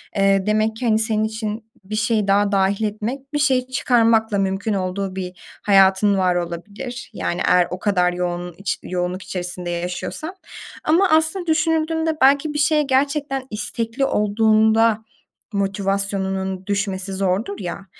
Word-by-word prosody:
Eee, 195 -1 +3
demek 215 +1 +1
ki, 245 - -5
hani, 220 -2 +3
senin 215 -1 0
için 220 0 -4
bir 205 +3 -5
şeyi 215 -1 +1
daha 200 +1 +3
dâhil 195 +2 +1
etmek 240 +7 -4
bir 295 - 0
şeyi 260 -4 +2
çıkarmakla 230 -4 +2
mümkün 195 +2 -1
olduğu 190 0 -2
bir 180 -1 -6 0.3
hayatın 195 0 +5
var 185 -1 +2
olabilir, 200 +9 -5
yani 175 - -2
eğer 180 -1 +4
o 180 - -4
kadar 180 -3 +1
yoğun 175 0 -3
iç 195 - -2
yoğunluk 180 +1 -3
içerisinde 180 -1 -5
yaşıyorsan. 180 - -4 0.5
Ama 355 +5 +3
aslında 320 +4 +2
düşünüldüğünde 320 0 +1
belki 285 +3 +4
bir 295 - -2
şeye 305 0 +3
gerçekten 270 0 0
istekli 230 +4 -2
olduğunda 220 0 +3 0.5
motivasyonunun 195 -1 -1
düşmesi 195 -1 -2
zordur 195 +2 -1
ya, 190 +1 -6
210 Hz, 140 wpm, -21 LUFS, 190-245 Hz, 0.5 s, hayatın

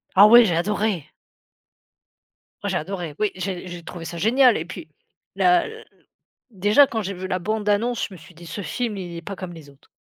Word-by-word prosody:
Ah 200 +2 +9
ouais, 240 +2 +9
j'ai 175 -6 +1
adoré. 200 -2 -1 1.6
Moi - - -1
j'ai - - 0
adoré, 175 -2 -5
oui, 210 -1 +1
j'ai 185 0 -4
j'ai 175 -1 -8
trouvé 170 0 -8
ça 170 - -6
génial 245 +7 +4
et - - -4
puis - - -9 0.5
la 355 -1 +4 0.9
déjà 210 +7 +4
quand 225 -4 -2
j'ai 195 -1 -4
vu 185 +1 -6
la 185 -1 -1
bande 210 +3 -2
annonce, 230 +4 +1
je 195 - -12
me - - -12
suis 170 +3 -16
dit: 170 +1 -13
«Ce 170 +5 -6
film, 230 +2 -3
il 175 -3 -6
est 170 - -7
pas 195 +3 -7
comme 185 -1 -7
les 160 -4 -12
autres». 140 0 -24
195 Hz, 210 wpm, -23 LUFS, 175-215 Hz, 1.6 s, Ah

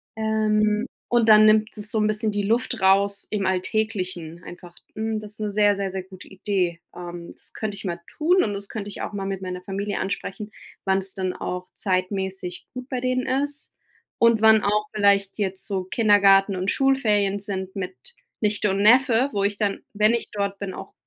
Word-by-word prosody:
Ähm, 215 0 +1 0.2
und 240 -2 +3
dann 215 0 +8
nimmt 215 +1 +4
das 210 0 -2
so 225 - -1
'n 210 - +2
bisschen 215 0 0
die 205 0 -1
Luft 230 +3 0
raus 200 +1 +3
im 205 -2 -1
alltäglichen 185 -3 -2
einfach. 175 0 -11 0.2
Mhm, 220 0 -2
das 210 0 -8
'ne 210 -1 -2
sehr, 205 0 +3
sehr, 195 -1 -3
sehr 190 0 -4
gute 185 0 -13
Idee. 185 -3 -1 0.2
Ähm, 175 -1 -8
das - - -8
könnte 215 -2 -4
ich - - -8
mal 175 -2 -3 0.2
tun, 355 +5 +3
und 205 - -1
das 200 0 -7
könnte 205 -2 -5
ich - - -7
auch - - -4
mal 195 -1 -4
mit 195 -1 -4
meiner 180 -1 -5
Familie 200 +2 -3
ansprechen, 200 +1 -4 0.3
wann 190 0 +2
es 190 0 -7
dann 185 -2 -2
auch 180 0 -5
zeitmässig 190 -1 -2
gut 250 0 -7
bei 255 -2 -2
denen 255 0 0 0.2
ist 290 0 -1 0.4
,und 230 -2 +4
wann 220 -1 +6
auch 210 +1 +1
vielleicht 200 -2 +2
jetzt 190 -2 -2
so 195 -3 -2
Kindergarten 200 -1 +4
und 185 +2 -1
Schulferien 210 -7 +2
sind 190 -2 -5
mit 185 -1 -4 0.5
Nichte 210 -1 +1
und 195 +1 0
Neffe, 250 +3 +5
wo 200 - 0
ich 200 0 0
dann, 200 -2 -1
wenn 215 +2 +3
ich 235 - -1
dort 200 -1 -3
bin, 195 -2 -5
auch - - -9
205 Hz, 195 wpm, -24 LUFS, 190-215 Hz, 0.5 s, dann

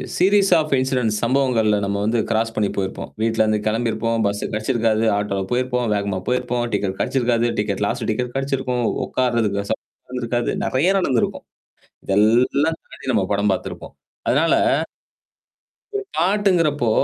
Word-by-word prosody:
Series 195 +2 +4
of 155 -2 0
incidents 125 -4 0
சம்பவங்கள்ல 115 -5 +2
நம்ம 100 0 -1
வந்து 115 +1 +1
cross 115 +1 0
பண்ணி 105 -2 +1
போயிருப்போம். 95 -1 -3
வீட்லருந்து 110 -1 +2
கிளம்பிருப்போம். 115 0 0
பஸ்சு 100 0 -1
கெடச்சிருக்காது, 110 0 0
ஆட்டோல 100 -1 -1
போயிருப்போம், 125 -1 0
வேகமா 100 -2 -1
போயிருப்போம், 125 -1 0
டிக்கெட் 95 -1 -1
கெடச்சிருக்காது, 120 -2 +1
டிக்கெட் 105 -1 -1
லாஸ்ட் 115 +1 -2
டிக்கெட் 125 +2 -3
கெடச்சிருக்கும், 135 -3 -1 0.2
உட்கார்றதுக்கு 115 -5 0
வெச 100 - -6 0.4
நடந்திருக்காது. 120 -1 -2
நெறைய 155 +9 +2
நடந்திருக்கும். 130 -10 0 0.6
இது 95 - 0
எல்லாம் 125 +8 +3
தாண்டி, - - -12
நம்ம - - +2
படம் - - +1
பாத்து - - -3
இருப்போம். - - -11 0.3
அதனால - - +3 1.4
ஒரு 410 - -1
பாட்டுங்கிறப்போ, 170 - +2
120 Hz, 135 wpm, -21 LUFS, 110-130 Hz, 1.4 s, Series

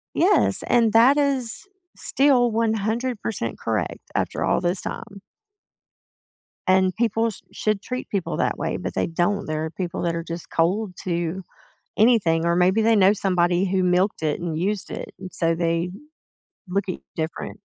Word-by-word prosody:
Yes. 380 +5 +3
And 230 -3 +3
that 240 +5 +6
is 275 - -1 0.3
still 265 -4 +3
100% 220 - -1
correct 110 -7 -2 0.2
after - - -1
all - - +2
this 180 +1 -1
time. 200 -3 -7 1.5
And 185 0 +3
people 225 0 +1
sh 210 - -11
should 215 -2 -1
treat 250 0 -5
people 195 -4 -2
that - - 0
way, - - -2
but - - -5
they 95 - +1
don't, 175 +5 0
there 155 0 -2
are 160 - -4
people 180 0 -4
that 170 -1 0
are 165 - -3
just 170 0 -7
cold 185 +4 0
to 175 0 -2 0.6
anything, 195 -8 +4
or 170 - +2
maybe 185 +5 +3
they 225 0 +4
know 195 0 +5
somebody 180 -2 +1
who 185 -1 +1
milked 180 +1 +1
it 150 -1 0
and 165 -3 -3
used 195 +4 -2
it, - - -6
and 185 -1 -8
so 165 -1 +1
they 170 +1 0 0.8
look 195 +1 -1
at 185 - -2
y - - -16 0.2
different. 160 +5 -4
190 Hz, 165 wpm, -23 LUFS, 170-220 Hz, 1.5 s, that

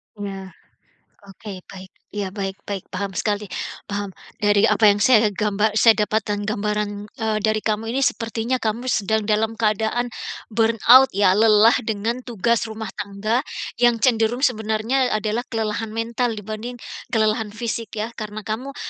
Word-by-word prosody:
Ya, 195 -2 -7 0.7
oke, 195 -1 -10
baik, 190 0 -11 0.2
ya, 205 -2 -3
baik 195 0 -5
baik, 200 -2 -4
paham 190 0 -4
sekali, 210 -1 -1 0.4
paham. 200 -1 -3 0.2
Dari 205 +1 +3
apa 225 - +2
yang 205 -1 +5
saya 220 -2 +5
gamba 210 +1 0
saya 220 +1 +5
dapatkan 210 -1 -1
gambaran, 210 0 -2
eee, 220 0 -2
dari 215 0 0
kamu 220 +1 -1
ini 265 +4 +1
sepertinya 230 +1 -1
kamu 225 +2 -2
sedang 220 -3 0
dalam 220 +1 0
keadaan, 220 +2 0 0.4
burn 225 +1 +2 0.2
out 265 +1 +9
ya, 200 -2 +5
lelah 215 +2 +6
dengan 225 +2 -2
tugas 235 -2 0
rumah 220 0 -6
tangga, 210 +3 -2 0.4
yang 240 -1 +5
cenderung 235 +1 +2
sebenarnya 225 +2 +1
adalah 215 +2 -1
kelelahan 225 0 -2
mental 230 +1 -2
dibanding, 215 +4 -6 0.3
kelelahan 220 0 +1
fisik 225 0 -5
ya. 220 +2 -3
Karena 215 -2 -7
kamu, 255 +6 -5
215 Hz, 145 wpm, -22 LUFS, 205-230 Hz, 0.7 s, out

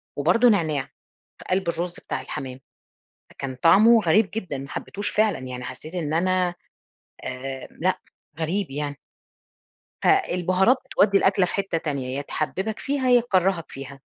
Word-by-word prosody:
وبرضه 180 - +4
نعناع 155 -9 +1 0.6
في - - -12
قلب 185 -1 +1
الرز 175 +2 -2
بتاع - - -4
الحمام، 130 -1 -6 0.7
فكان 135 -1 -6
طعمُه 215 - +6
غريب 195 +5 +3
جدًا، 180 -11 -4
ما 135 +1 -7
حبيتوش 205 +6 -4
فعلًا 215 -4 +2
يعني 125 -1 -7
حسّيت 140 +6 -8
إن 155 -4 -2
أنا، 185 +1 +1 0.7
آآ، 130 +1 -6
لأ 185 +2 +1 0.4
غريب 170 +2 -1
يعني. 145 0 -4 1.0
فالبهارات 190 - +3
بتودّي 200 -1 +3
الأكلة 190 -1 +3
في - - -6
حتة 195 -4 -1
تانية، 135 -4 -3
يا 140 - -2
تحببك 190 +9 -3
فيها، 275 -2 0
يا 245 -1 +7
تكرّهك 190 -6 +1
فيها. 135 0 -9
175 Hz, 145 wpm, -24 LUFS, 140-200 Hz, 1.0 s, يا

